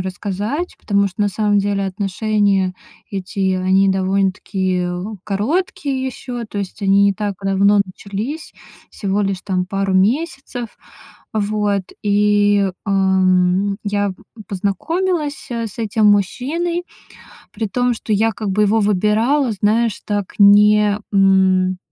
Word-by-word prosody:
рассказать, 205 - -4
потому 200 -1 +1
что 185 +2 -9
на 205 - +2
самом 205 +1 +1
деле, 200 0 0
отношения 195 0 0 0.4
эти, 190 -1 -2
они 190 +1 +3
довольно-таки 190 -1 0 0.4
короткие 265 - -1
ещё. 245 -2 -6
То 210 -2 -7
есть 200 +1 -6
они 200 +1 +4
не 200 - +3
так 205 0 -3
давно 200 +1 +3
начались, 205 - -6 0.4
всего 200 0 -1
лишь, 195 -2 -2
там, 185 -2 -1
пару 195 0 -1
месяцев. 245 - 0 0.6
Вот. 210 -2 0 0.2
И, 205 -1 +3 0.2
эм, 190 0 +2
я 205 -1 -1 0.3
познакомилась, 295 - -2
э, 230 -1 -2
с 210 - -11
этим 215 -1 +1
мужчиной, 280 - 0 0.7
при 220 0 -3
том, 245 +3 0
что 220 - -4
я 220 +2 +2
как 210 0 -5
бы 210 +3 +1
его 210 +2 +3
выбирала, 215 +7 +2
знаешь, 215 +2 +1
так, 205 -2 -3
не, 210 0 +6
м 190 -1 +3
205 Hz, 125 wpm, -18 LUFS, 195-220 Hz, 0.7 s, не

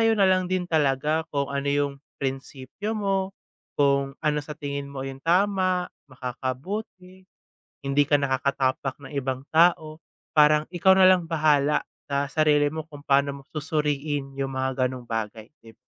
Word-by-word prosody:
'yo 225 - +4
nalang 190 -3 +3
din 180 -1 -2
talaga 150 +1 +1
kung 140 -1 0
ano 140 0 -2
yung 145 0 +1 0.3
prinspyo 135 - -4
mo. 195 -2 -1 0.4
Kung 140 -1 +2
ano 150 -1 +1
sa 150 +1 -6
tingin 140 -1 -5
mo 140 -1 -6
yung 135 0 -6
tama, 185 +2 +1 0.2
makakabuti. 180 - -6 0.6
Hindi 140 +1 +3
ka 145 - +5
nakakatapak 135 -1 0
ng - - -11
ibang 135 -1 -3
tao. 160 -1 +3 0.3
Parang 150 0 +5
ikaw 190 +2 +5
nalang 185 -3 +5
bahala 150 -2 +2 0.2
sa 140 0 0
sarili 145 0 +2
mo 160 0 -6
kung 145 -1 -12
paano 140 0 +2
mo - - -12
susuriin 150 -2 -2
yung 135 0 -3
mga 130 0 0
gano'ng 125 -1 -8
bagay, 110 -1 -4 0.2
dib 115 -1 -15
145 Hz, 145 wpm, -25 LUFS, 135-165 Hz, 0.6 s, ka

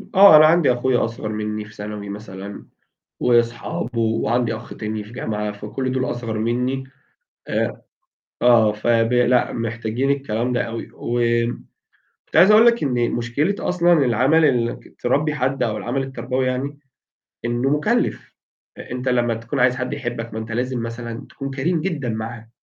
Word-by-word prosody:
آه 195 -3 +9
أنا 155 0 +9
عندي 160 -4 +4
أخويا 125 0 +1
أصغر 115 -1 -5
مني 105 0 -3
في 105 - -15
ثانوي 105 0 -6
مثلًا، 100 -1 -8 0.6
وصحابه، 120 0 0
وعندي 115 +1 +1
أخ 110 +1 -9
تاني 110 -1 -4
في 105 - -14
جامعة، 105 -4 -3
فكل 105 +6 -4
دول 130 -1 -1
أصغر 115 -2 -4
مني 125 +4 -1 0.6
آآ، - - -2 0.6
آه 115 -3 +5
فب 115 +2 +1
لأ، 125 0 +3
محتاجين 115 +3 -1
الكلام 125 -3 -1
ده 125 - +1
أوي، 115 0 -5
و 120 +1 -3 1.1
كنت - - -11
عايز 190 +4 +8
أقول 215 +2 +7
لك 235 -4 +4
إن 125 -4 +1
مشكلة 120 +11 0
أصلًا 175 -1 +2
العمل 130 +7 +3
ال 120 -5 +2
إنك - - -10
تربي 145 +5 +1
حد 135 -1 0
أو 110 -3 -1
العمل 135 +3 -2
التربوي 130 0 -2
يعني، 135 +3 -2 0.7
إنه 120 +3 0
مكلف. 210 - 0 0.6
أنت 125 +1 -2
لما 120 -1 +2
تكون 115 +5 -4
عايز 125 0 +4
حد 130 +2 -3
يحبك 120 -4 -5
ما 110 - -3
أنت 110 0 -7
لازم 125 +1 -2
مثلًا 115 +1 -6
تكون 135 -1 -6
كريم 155 +5 0
جدًا 155 -8 -2
معاه، 110 +1 -5
120 Hz, 160 wpm, -21 LUFS, 115-135 Hz, 1.1 s, آه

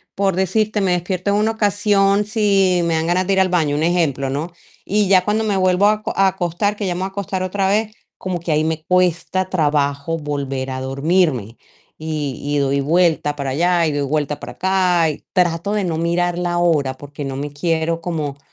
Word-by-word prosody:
por 195 -2 +1
decirte, 210 +3 0
me 185 -2 +2
despierto 180 +2 -2
en 200 - +2
una 220 +1 +2
ocasión 205 -1 +2
si 200 -4 +2
me 165 - +1
dan 160 0 0
ganas 180 +2 +1
de 195 - +2
ir 190 - +2
al 190 - +2
baño, 160 -5 +1
un 150 - 0
ejemplo, 155 -6 0
¿no?, 155 +5 -3 0.4
y 210 0 +2
ya 185 -1 +5
cuando 215 +1 +1
me 205 -3 0
vuelvo 185 +2 +3
a 210 - +5
aco 215 0 -4
a 195 0 +4
acostar, 190 +2 -1
que 205 -1 -4
ya 180 - 0
me - - -4
voy 190 - -1
a - - -8
acostar 195 -1 -4
otra 190 +1 -1
vez, 215 +2 +1 0.3
como 185 -2 -3
que 170 -1 -4
ahí 155 +1 +2
me 160 0 -2
cuesta 180 +1 +1
trabajo 145 -2 0
volver 140 -3 -4
a 130 - -4
dormirme 135 - 0 0.4
y 155 -4 -4 0.2
y, - - +2
doy 140 0 +1
vuelta 160 -1 +2
para 140 -2 -3
allá 170 +5 +2
y - - 0
doy 145 -1 -1
vuelta 150 0 -1
para - - -8
acá 185 -3 +2
y, 150 - -7
trato 175 +1 +1
de 210 -2 0
no 165 -3 -2
mirar 170 +1 0
la 175 -1 -1
hora 150 -6 +2
porque 145 +1 -8
no 135 -1 -4
me 145 +2 -4
quiero 165 +2 -1
como 155 -5 -4
175 Hz, 215 wpm, -19 LUFS, 150-190 Hz, 0.4 s, ya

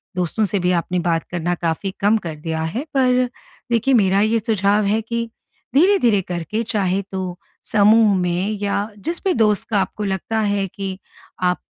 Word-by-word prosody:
दोस्तों 180 +4 0
से 200 +1 -1
भी 180 0 +1
आपने 175 +1 0
बात 165 -1 +1
करना 175 0 -1
काफ़ी 170 +3 -2
कम 205 +3 +3
कर 160 -2 -4
दिया 160 -1 -2
है 260 - -1
पर 255 -1 +3 0.4
देखिए 235 +4 +2
मेरा 200 -4 +4
ये 225 +2 +2
सुझाव 210 -1 +1
है 215 +3 +1
कि 230 +1 -3 0.5
धीरे-धीरे 285 - +4
करके 180 +5 -3
चाहे 195 -4 0
तो 185 -2 -4 0.3
समूह 215 0 +4
में 180 +2 0
या 205 +1 -1 0.2
जिस 340 +3 -2
भी 380 - +3
दोस्त 215 -3 +2
का 210 - +2
आपको 210 - -4
लगता 200 +3 -2
है 205 -2 0
कि 190 0 -6 0.5
आप 180 0 +2
200 Hz, 175 wpm, -20 LUFS, 180-225 Hz, 0.5 s, मेरा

